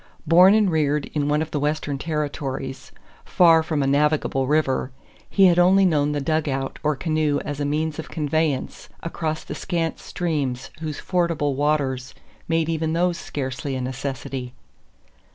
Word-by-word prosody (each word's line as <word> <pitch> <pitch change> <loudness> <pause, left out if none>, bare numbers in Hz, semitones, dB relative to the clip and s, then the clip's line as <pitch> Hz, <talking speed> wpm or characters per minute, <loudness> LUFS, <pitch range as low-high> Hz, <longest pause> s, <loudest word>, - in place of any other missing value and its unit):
Born 180 +5 +7
and 210 -4 +3
reared 150 -2 +1
in 145 -1 0
one 150 +1 +2
of 160 - -9
the 150 - -1
Western 145 -1 -1
Territories, 140 -4 -4 0.3
far 165 -2 +5
from 155 -3 -1
a - - 0
navigable 140 -1 +1
river, 140 -3 +1 0.4
he 195 - +5
had 175 -1 +5
only 190 +2 +5
known 150 -4 +2
the 145 - -1
"dugout" 140 -2 -1
or 150 -1 +1
canoe 155 -1 0
as 145 -1 -4
a 145 - -1
means 155 +2 -1
of 160 - -6
conveyance 155 -3 -2
across 160 -1 -3
the - - -7
scant 165 +3 -2
streams 140 -7 -3
whose 155 -2 -5
fordable 165 -5 0
waters 135 -2 -1 0.3
made 165 -1 +1
even 160 -1 -1
those 175 +1 +1
scarcely 135 0 -4
a 130 - -3
necessity. 130 -1 -5
150 Hz, 155 wpm, -23 LUFS, 140-160 Hz, 0.4 s, Born